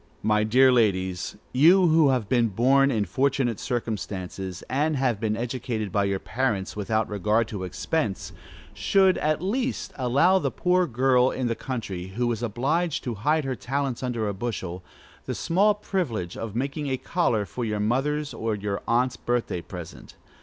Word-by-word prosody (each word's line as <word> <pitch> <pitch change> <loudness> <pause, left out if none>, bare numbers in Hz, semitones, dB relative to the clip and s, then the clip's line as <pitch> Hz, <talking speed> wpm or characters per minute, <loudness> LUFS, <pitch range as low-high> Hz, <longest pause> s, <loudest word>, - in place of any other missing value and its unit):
My 105 0 +3
dear 130 +5 +5
ladies, 95 -6 +1 0.2
you 170 +8 +6
who 160 -2 +5
have 125 -6 0
been 120 0 +3
born 130 +7 +3
in 110 -6 0
fortunate 135 -3 0
circumstances, 95 -6 -4
and 150 +4 0
have 125 -5 +1
been 110 -1 -1
educated 115 -3 -3
by 100 +1 +1
your 100 0 0
parents, 110 -3 -2
without 110 +1 0
regard 105 +3 +1
to 100 -4 -5
expense, 100 - -2 0.4
should, 190 -1 +3
at 155 +2 0
least, 245 +6 -2
allow 140 +9 +3
the - - 0
poor 180 0 +1
girl 125 +1 +3
in 130 - -3
the 115 - +1
country, 100 -8 -5
who 120 0 +1
is 115 -1 -3
obliged 140 +9 -1
to 125 - -3
hide 150 +9 0
her 130 -1 -2
talents 135 0 -2
under 120 -4 -2
a 100 - -1
bushel, 95 -4 -4 0.4
the - - -2
small 200 +5 +2
privilege 135 - -3
of 110 -2 -6
making 140 +4 -2
a 130 -1 0
collar 125 - 0
for 125 - -5
your 105 -2 -2
mother's 140 +6 0
or 115 -1 -2
your 100 -1 -3
aunt's 125 +2 +1
birthday 120 -7 -1
present. 85 -2 -10
120 Hz, 165 wpm, -25 LUFS, 105-140 Hz, 0.4 s, you